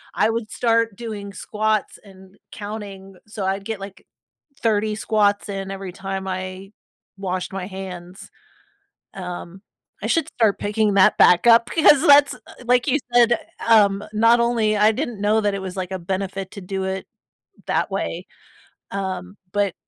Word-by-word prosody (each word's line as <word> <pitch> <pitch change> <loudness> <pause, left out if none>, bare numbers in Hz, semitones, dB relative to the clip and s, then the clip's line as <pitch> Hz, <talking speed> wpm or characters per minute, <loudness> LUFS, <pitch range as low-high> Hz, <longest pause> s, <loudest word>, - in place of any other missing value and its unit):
I 210 +5 +3
would 225 -1 -3
start 230 -3 +1
doing 205 -3 -7
squats 215 +1 -2
and 190 -1 -17
counting 205 -2 -8
g - - -20
So, 210 -3 -5
I'd 195 +1 -1
get, 220 -3 -4
like, 195 0 -10 0.6
30 215 -1 +1
squats 205 -2 +1
in 195 -1 -5
every 195 -1 -6
time 195 0 -5
I 185 +1 -5 0.5
washed 185 -1 -3
my 190 -1 -4
hands. 185 -2 -9 0.8
Um, 180 0 -7 0.4
I - - -2
should 330 - +1
start 220 -4 +1
picking 210 0 0
that 190 -1 +5
back 180 +6 +6
up 230 0 +6
because 300 -4 +5
that's, 285 0 +7
uh, - - -14 0.3
like, 250 +1 +3
you 270 - +3 0.2
said, 240 0 +6
eh, - - +4 0.3
um 205 -3 +5
not 230 +2 +4
only 230 -3 +2
I 210 +2 +4
didn't 240 -4 -4
know 215 +2 +2
that 205 -1 +1
it 195 - -3
was, 190 0 -6
like, 185 0 -4
a 190 - -2
benefit 190 +1 -4
to 200 - -8
do 190 +1 -4
it 190 0 -4 0.6
that - - 0
way. - - -3 0.6
Um, 190 0 -4 0.2
but 205 -1 +1
200 Hz, 165 wpm, -22 LUFS, 190-220 Hz, 0.8 s, that's